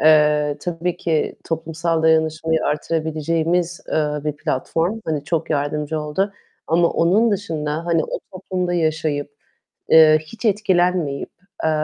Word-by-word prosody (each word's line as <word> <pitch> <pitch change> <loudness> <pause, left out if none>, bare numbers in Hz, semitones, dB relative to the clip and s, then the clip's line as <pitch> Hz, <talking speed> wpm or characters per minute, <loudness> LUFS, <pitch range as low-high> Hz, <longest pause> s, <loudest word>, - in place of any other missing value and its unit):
eee, 150 -1 +4
tabii 175 0 -2
ki 160 -3 -1
toplumsal 165 0 -2
dayanışmayı 160 0 +2
artırabileceğimiz, 165 +3 -1
eee, 150 -1 0
bir 150 -1 -2
platform. 165 +7 -1
Hani 150 -3 -2
çok 165 0 -2
yardımcı 150 +1 -1
oldu 170 +7 -1 0.3
ama 170 +1 +3
onun 200 +8 +3
dışında 165 -5 -2
hani 165 -2 +2
o - - -4
toplumda 185 -1 -3
yaşayıp, 155 -3 -1 0.6
eee, 155 -1 +8
hiç 225 +9 -9
etkilenmeyip, 180 -8 +1 0.3
eee, 160 - +3
160 Hz, 120 wpm, -21 LUFS, 150-175 Hz, 0.6 s, eee